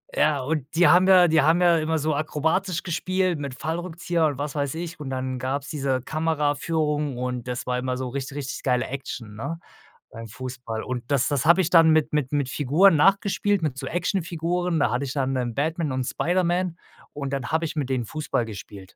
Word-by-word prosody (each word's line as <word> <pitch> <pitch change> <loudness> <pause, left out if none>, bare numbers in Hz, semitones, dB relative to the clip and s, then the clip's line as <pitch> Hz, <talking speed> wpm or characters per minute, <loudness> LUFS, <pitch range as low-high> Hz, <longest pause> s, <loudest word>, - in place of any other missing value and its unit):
Ja, 150 -2 +2
und 145 -1 -2
die 175 +1 +5
haben 185 +1 +6
ja 185 -2 +7
die 160 -1 +4
haben 160 +4 +4
ja 175 -2 +5
immer 160 +1 0
so 155 +1 0
akrobatisch 160 +5 -1
gespielt 185 -1 -1
mit 140 -3 -5
Fallrückzieher 170 0 -1
und 145 -3 -3
was 145 +1 -3
weiß 140 -1 -2
ich 165 -1 -6
und 145 -3 -6
dann 130 -1 -3
gab's 135 +2 -3
diese 135 -4 -1
Kameraführung 150 -1 -1
und 125 -1 -4
das 125 0 -4
war 125 0 -1
immer 125 0 -2
so 130 -1 -4
richt 135 +2 -4
richtig 140 -2 -5
geile 125 -1 +1
Action, 125 -5 -6
ne, 165 +10 -4 0.5
beim 115 0 -8
Fußball. 125 -1 -6
Und 125 -2 -4
das 135 -3 +2
das 140 -1 0
habe 170 +3 +6
ich 170 - -1
dann 165 -2 +7
mit 155 -1 +2
mit 145 -4 0
mit 145 -3 0
Figuren 155 +8 +4
nachgespielt 195 +3 +2
mit 150 -5 -1
so 135 - -5
Actionfiguren, 175 0 -1
da 145 - +2
hatte 125 +3 -1
ich 135 - -4
dann, 135 -2 -1
ähm, 120 -3 -2
Batman 155 +1 -1
und 130 0 -1
Spider-Man 175 +2 0 0.4
und 140 -1 -4
dann 135 -3 -2
habe 160 +2 0
ich 155 - -5
mit 145 -4 -2
denen 130 -3 -1
Fußball 150 -2 -2
gespielt. 100 -3 -10
150 Hz, 205 wpm, -24 LUFS, 130-165 Hz, 0.5 s, ja